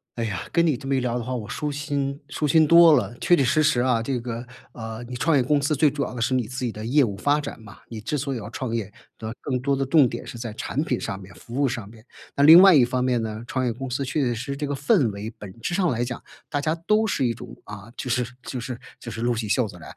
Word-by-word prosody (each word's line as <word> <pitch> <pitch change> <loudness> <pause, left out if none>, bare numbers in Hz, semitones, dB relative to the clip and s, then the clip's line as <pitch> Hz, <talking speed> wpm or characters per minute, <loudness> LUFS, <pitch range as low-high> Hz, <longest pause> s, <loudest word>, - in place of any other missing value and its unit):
哎 115 - -2
呀， 95 -4 -3
跟 170 -1 +3
你 150 - +2
这 135 +2 -8
么 140 - +2
一 130 - +2
聊 125 -1 -1
的 120 - -3
话， 130 +2 -4
我 110 -4 -4
舒 150 +5 -3
心 140 -1 -3
舒 150 - -3
心 155 +2 +4
多 170 -1 +8
了。 120 -3 +1
确 175 - +3
确 140 - +2
实 155 +5 +3
实 150 -5 +3
啊， 120 -2 +2
这 125 0 -1
个， 120 0 -5 0.3
呃， 110 -1 -7
你 125 - -6
创 155 +3 +2
业 - - +4
公 145 +4 +2
司 145 +2 +1
最 150 +1 +4
主 145 0 -2
要 - - -5
的 120 - -5
是 130 - +1
你 125 -4 0
自 130 0 -4
己 120 - -1
的 110 +1 -7
业 145 +5 +3
务 105 -7 0
发 145 +8 +1
展 145 -4 -6
嘛， 110 0 -13
你 110 -2 -8
之 145 +8 -2
所 135 -1 -2
以 - - -3
要 105 0 -7
创 120 -1 -4
业， 105 -3 -3 0.3
那 110 0 -4
更 130 -3 -2
多 140 +1 +1
的 135 0 0
重 135 -3 +5
点 120 - -7
是 120 - -7
在 115 -1 -5
产 135 +6 -2
品 125 -6 -1
上 95 - -4
面、 95 0 -13
服 120 +4 -7
务 145 - +3
上 120 -6 -3
面。 110 +1 -16 0.3
那 140 - +2
另 165 +4 +10
外 190 -3 +8
一 135 - +6
方 125 +1 0
面 125 -2 +1
呢， 110 0 -4
创 130 -1 -1
业 120 - +1
公 135 +3 -6
司 130 +3 -2
确 135 +3 -2
确 135 - +2
实 120 - -1
实 140 +4 -5
这 145 - -3
个 145 - -2
氛 145 - +2
围 105 +3 -7
本 105 +1 -10
质 175 - -2
上 180 -2 +2
来 120 -3 0
讲， 120 0 -5 0.3
大 145 - -1
家 155 +2 0
都 215 +1 +3
是 140 -9 0
一 115 - +1
种， - - -10
啊， 105 +1 -10
就 130 - -5
是 125 0 +1 0.2
就 130 - -5
是 120 +1 -5 0.2
就 - - -8
是 115 - -6
撸 120 0 +1
起 110 -2 -3
袖 120 +4 +2
子 100 -4 -9
来。 - - -11
125 Hz, 330 characters per minute, -24 LUFS, 115-145 Hz, 0.3 s, 另